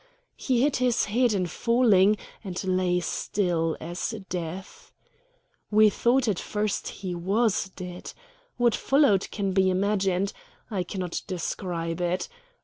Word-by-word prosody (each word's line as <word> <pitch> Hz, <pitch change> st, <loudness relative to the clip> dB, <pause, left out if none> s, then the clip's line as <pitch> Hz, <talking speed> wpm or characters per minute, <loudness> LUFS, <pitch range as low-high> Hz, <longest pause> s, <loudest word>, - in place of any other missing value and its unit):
He 250 Hz, -2 st, +1 dB
hit 290 Hz, -1 st, +2 dB
his 250 Hz, -2 st, +2 dB
head 240 Hz, +3 st, +2 dB
in 190 Hz, -3 st, +1 dB
falling, 215 Hz, 0 st, +3 dB, 0.3 s
and 185 Hz, -2 st, -4 dB
lay 185 Hz, -1 st, +1 dB
still 170 Hz, -2 st, -1 dB
as 175 Hz, +7 st, -4 dB
death. 180 Hz, +2 st, -6 dB, 0.8 s
We 215 Hz, 0 st, +5 dB
thought 245 Hz, +4 st, +2 dB
at 200 Hz, -5 st, +1 dB
first 210 Hz, -1 st, -2 dB
he 185 Hz, -2 st, -5 dB
was 195 Hz, +3 st, +1 dB
dead. 180 Hz, -1 st, -7 dB, 0.5 s
What 240 Hz, -2 st, +3 dB
followed 270 Hz, -9 st, +3 dB
can 200 Hz, -2 st, -2 dB
be 190 Hz, 0 st, +3 dB
imagined. 195 Hz, 0 st, +1 dB, 0.4 s
I 195 Hz, -3 st, -1 dB
cannot 180 Hz, -1 st, -4 dB
describe 175 Hz, -2 st, -3 dB
it. 175 Hz, +1 st, -1 dB
190 Hz, 130 wpm, -26 LUFS, 180-215 Hz, 0.8 s, We